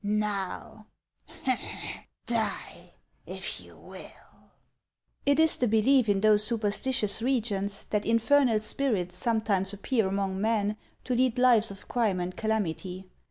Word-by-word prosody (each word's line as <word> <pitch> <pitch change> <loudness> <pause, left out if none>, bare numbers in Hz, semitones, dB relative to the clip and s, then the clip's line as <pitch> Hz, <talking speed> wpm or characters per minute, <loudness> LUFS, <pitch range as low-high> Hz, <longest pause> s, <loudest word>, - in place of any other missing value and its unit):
Now, 210 0 -3 1.4
die 230 -1 -2 0.3
if - - -5
you - - -16
will." - - -15 0.8
It 285 +1 +3
is 320 0 +4
the 245 - +1
belief 225 +2 +3
in 195 -1 +2
those 210 -1 +5
superstitious 215 0 +1
regions 210 -6 -1
that 210 -1 0
in 230 0 +4
fernal 235 -2 +3
spirits 210 -8 0
sometimes 205 -2 0
appear 215 +1 0
among 195 0 -2
men 215 -1 0 0.3
to 255 - -2
lead 250 0 +1
lives 240 -3 +4
of 200 0 -11
crime 220 -7 0
and 180 +1 -4
calamity. 190 -3 -3
215 Hz, 125 wpm, -28 LUFS, 200-235 Hz, 1.4 s, those